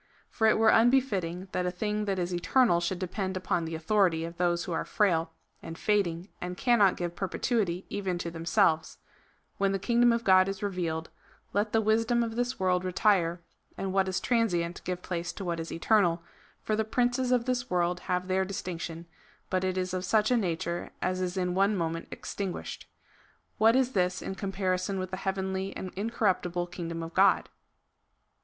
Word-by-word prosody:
For 220 Hz, -, +2 dB
it 220 Hz, -, +4 dB
were 220 Hz, 0 st, +5 dB
unbefttting, 200 Hz, -8 st, +2 dB
that 180 Hz, 0 st, -1 dB
a -, -, +2 dB
thing 210 Hz, +3 st, -2 dB
that 195 Hz, -2 st, -1 dB
is 180 Hz, 0 st, -2 dB
eternal 175 Hz, +2 st, +3 dB
should 175 Hz, +2 st, -2 dB
depend 190 Hz, +1 st, -3 dB
upon 175 Hz, -2 st, -1 dB
the 165 Hz, 0 st, -4 dB
authority 165 Hz, -1 st, +2 dB
of 170 Hz, +1 st, -8 dB
those 175 Hz, -1 st, +1 dB
who -, -, -6 dB
are 165 Hz, -, -1 dB
frail, 165 Hz, -6 st, +1 dB, 0.3 s
and 165 Hz, -, -8 dB
fading, 190 Hz, -3 st, 0 dB
and 180 Hz, 0 st, -5 dB
cannot 225 Hz, -6 st, +4 dB
give 175 Hz, -1 st, -3 dB
perpetuity 190 Hz, -1 st, -1 dB
even 195 Hz, -3 st, -2 dB
to 170 Hz, -1 st, -4 dB
themselves: 165 Hz, 0 st, +1 dB, 0.3 s
" -, -, -39 dB
When 195 Hz, 0 st, +2 dB
the -, -, +1 dB
kingdom 235 Hz, +4 st, +3 dB
of 235 Hz, 0 st, 0 dB
God 185 Hz, -2 st, +5 dB
is 195 Hz, +1 st, -4 dB
revealed, 170 Hz, -5 st, -2 dB, 0.4 s
let 210 Hz, +1 st, 0 dB
the 225 Hz, -, +3 dB
wisdom 225 Hz, +2 st, +2 dB
of 225 Hz, -1 st, -4 dB
this 245 Hz, +1 st, -1 dB
world 180 Hz, -1 st, +1 dB
retire, 185 Hz, -2 st, +2 dB, 0.4 s
and 190 Hz, -1 st, -3 dB
what 190 Hz, -1 st, +2 dB
is 185 Hz, -, -1 dB
transient 180 Hz, -8 st, 0 dB
give 180 Hz, -1 st, -3 dB
place 175 Hz, -1 st, -3 dB
to 195 Hz, -, -7 dB
what 170 Hz, -1 st, -2 dB
is 165 Hz, -, -5 dB
eternal; 175 Hz, -2 st, +2 dB, 0.4 s
for 215 Hz, -, 0 dB
the 220 Hz, -, +1 dB
princes 245 Hz, +3 st, 0 dB
of 245 Hz, -2 st, +2 dB
this 250 Hz, -1 st, 0 dB
Avorld 180 Hz, -4 st, 0 dB
have 180 Hz, 0 st, 0 dB
their 190 Hz, 0 st, +2 dB
distinction, 170 Hz, -3 st, -5 dB, 0.5 s
but 185 Hz, 0 st, +1 dB
it 185 Hz, 0 st, -1 dB
is 185 Hz, 0 st, -2 dB
of 185 Hz, 0 st, -2 dB
such 215 Hz, +4 st, +2 dB
a -, -, +5 dB
nature 170 Hz, -4 st, -2 dB
as 185 Hz, 0 st, 0 dB
is 185 Hz, +1 st, -2 dB
in 180 Hz, -1 st, 0 dB
one 195 Hz, +3 st, +3 dB
moment 165 Hz, -2 st, -2 dB
extinguished. 195 Hz, -3 st, -5 dB, 0.7 s
What 225 Hz, +2 st, +5 dB
is 260 Hz, -1 st, +2 dB
this 180 Hz, -4 st, 0 dB
in -, -, -4 dB
comparison 190 Hz, -1 st, -2 dB
with 185 Hz, 0 st, -4 dB
the 185 Hz, -, -3 dB
heavenly 190 Hz, 0 st, -2 dB
and 185 Hz, -, -6 dB
incorruptible 190 Hz, -4 st, 0 dB
kingdom 170 Hz, -2 st, -5 dB
of 165 Hz, 0 st, -7 dB
God?" 195 Hz, +1 st, +4 dB
185 Hz, 190 wpm, -29 LUFS, 175-210 Hz, 0.7 s, were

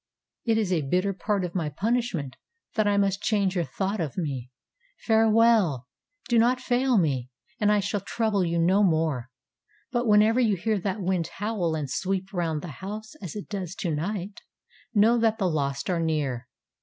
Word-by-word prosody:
It 225 Hz, -2 st, +2 dB
is 205 Hz, -4 st, +1 dB
a 165 Hz, -, +1 dB
bitter 180 Hz, +8 st, 0 dB
part 200 Hz, 0 st, -1 dB
of 175 Hz, -, -6 dB
my 165 Hz, -5 st, -1 dB
punishment 195 Hz, -, -1 dB, 0.4 s
that 215 Hz, -2 st, +1 dB
I 205 Hz, 0 st, +2 dB
must 195 Hz, 0 st, +1 dB
change 200 Hz, -4 st, +1 dB
your 175 Hz, -3 st, 0 dB
thought 195 Hz, +3 st, -2 dB
of 155 Hz, -1 st, -4 dB
me. 135 Hz, -8 st, -3 dB, 0.6 s
Farewell! 220 Hz, -, +4 dB, 0.4 s
Do 240 Hz, -3 st, +3 dB
not 245 Hz, +2 st, +3 dB
fail 255 Hz, 0 st, +2 dB
me, 135 Hz, -8 st, +1 dB, 0.3 s
and 210 Hz, -1 st, +3 dB
I 210 Hz, -1 st, +3 dB
shall 200 Hz, 0 st, -2 dB
trouble 215 Hz, -3 st, 0 dB
you 170 Hz, -1 st, 0 dB
no 180 Hz, +5 st, +3 dB
more. 160 Hz, -9 st, +1 dB, 0.6 s
But 240 Hz, -1 st, 0 dB
whenever 215 Hz, +3 st, +5 dB
you 220 Hz, -5 st, +3 dB
hear 215 Hz, +3 st, 0 dB
that 195 Hz, +2 st, -3 dB
wind 180 Hz, -2 st, 0 dB
howl 195 Hz, -6 st, -2 dB
and 150 Hz, -3 st, -3 dB
sweep 190 Hz, +6 st, -2 dB
round 165 Hz, -4 st, -1 dB
the 175 Hz, -, -6 dB
house 215 Hz, +3 st, -6 dB
as 180 Hz, -1 st, -6 dB
it 205 Hz, -, -6 dB
does 190 Hz, -4 st, -5 dB
to 170 Hz, -4 st, -2 dB
night, 190 Hz, +5 st, -4 dB, 0.5 s
know 230 Hz, +2 st, +4 dB
that 225 Hz, -1 st, +2 dB
the 195 Hz, -5 st, +1 dB
lost 140 Hz, -4 st, -1 dB
are 180 Hz, -2 st, 0 dB
near. 140 Hz, -7 st, -1 dB
195 Hz, 180 wpm, -26 LUFS, 165-215 Hz, 0.6 s, whenever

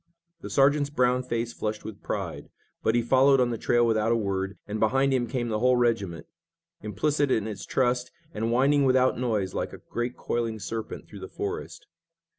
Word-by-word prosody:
The -, -, -8 dB
sergeant's 140 Hz, +1 st, +3 dB
brown 125 Hz, -3 st, +2 dB
face 120 Hz, -2 st, -3 dB
flushed 105 Hz, 0 st, -4 dB
with 110 Hz, -3 st, -8 dB
pride, -, -, -4 dB, 0.3 s
but 110 Hz, -, +1 dB
he 120 Hz, -, +2 dB
followed 135 Hz, +3 st, +5 dB
on 125 Hz, -1 st, +2 dB
the 115 Hz, -, -2 dB
trail 120 Hz, 0 st, +3 dB
without 110 Hz, 0 st, +2 dB
a -, -, +4 dB
word 100 Hz, -3 st, -2 dB
and 105 Hz, +1 st, -3 dB
behind 135 Hz, +5 st, +2 dB
him 125 Hz, -2 st, +1 dB
came 120 Hz, 0 st, -2 dB
the 110 Hz, -1 st, -1 dB
whole 125 Hz, +2 st, +4 dB
regiment, 105 Hz, -9 st, 0 dB, 0.6 s
implicit 140 Hz, +8 st, 0 dB
in 110 Hz, -5 st, +1 dB
its 105 Hz, -3 st, -6 dB
trust, 125 Hz, -1 st, +1 dB, 0.2 s
and 115 Hz, +2 st, -1 dB
winding 140 Hz, +4 st, +3 dB
without 130 Hz, -1 st, +3 dB
noise 110 Hz, -7 st, -1 dB
like -, -, -3 dB
a -, -, -7 dB
great 120 Hz, +1 st, -2 dB
coiling 115 Hz, -2 st, -2 dB
serpent 110 Hz, +2 st, -6 dB
through -, -, -11 dB
the -, -, -7 dB
forest. -, -, -5 dB
120 Hz, 190 wpm, -27 LUFS, 110-130 Hz, 0.6 s, followed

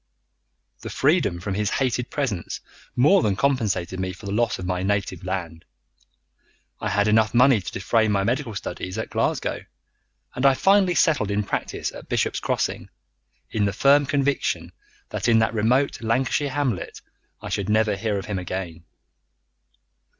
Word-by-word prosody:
The -, -, -7 dB
freedom 85 Hz, -, +1 dB
from 95 Hz, +2 st, -4 dB
his 105 Hz, +1 st, 0 dB
hated 125 Hz, -2 st, -1 dB
presence 120 Hz, -, -3 dB, 0.4 s
more 165 Hz, +10 st, +5 dB
than 100 Hz, -7 st, +1 dB
compensated 105 Hz, -8 st, 0 dB
me 95 Hz, 0 st, -2 dB
for 100 Hz, +4 st, -13 dB
the 100 Hz, -, -4 dB
loss 115 Hz, +2 st, +1 dB
of 95 Hz, -, -6 dB
my 90 Hz, 0 st, -1 dB
native 95 Hz, -2 st, -1 dB
land. 85 Hz, -3 st, -4 dB, 1.2 s
I -, -, -2 dB
had 105 Hz, +2 st, +2 dB
enough 110 Hz, +1 st, +3 dB
money 125 Hz, -3 st, +5 dB
to -, -, -6 dB
defray 110 Hz, +3 st, +1 dB
my 100 Hz, -2 st, +1 dB
medical 120 Hz, 0 st, -1 dB
studies 95 Hz, 0 st, -5 dB
at 110 Hz, -, -4 dB
Glasgow, -, -, -1 dB, 0.7 s
and 125 Hz, -, -4 dB
I 135 Hz, -1 st, +6 dB
finally 195 Hz, +1 st, +3 dB
settled 150 Hz, -13 st, +2 dB
in 100 Hz, +1 st, 0 dB
practice -, -, -3 dB
at -, -, -12 dB
Bishop's -, -, 0 dB
Crossing, -, -, -2 dB, 0.6 s
in 105 Hz, -2 st, +1 dB
the 100 Hz, -, 0 dB
firm 140 Hz, +6 st, +4 dB
conviction 140 Hz, -1 st, 0 dB, 0.4 s
that -, -, -3 dB
in 115 Hz, -1 st, +5 dB
that 110 Hz, 0 st, +2 dB
remote 120 Hz, +6 st, +1 dB
Lancashire 130 Hz, +5 st, 0 dB
hamlet 130 Hz, -, -2 dB, 0.4 s
I -, -, -7 dB
should 100 Hz, -1 st, -2 dB
never 110 Hz, -1 st, +2 dB
hear 105 Hz, 0 st, -1 dB
of 95 Hz, -, -5 dB
him 100 Hz, -3 st, -3 dB
again. 90 Hz, -2 st, -5 dB
110 Hz, 160 wpm, -24 LUFS, 95-130 Hz, 1.2 s, I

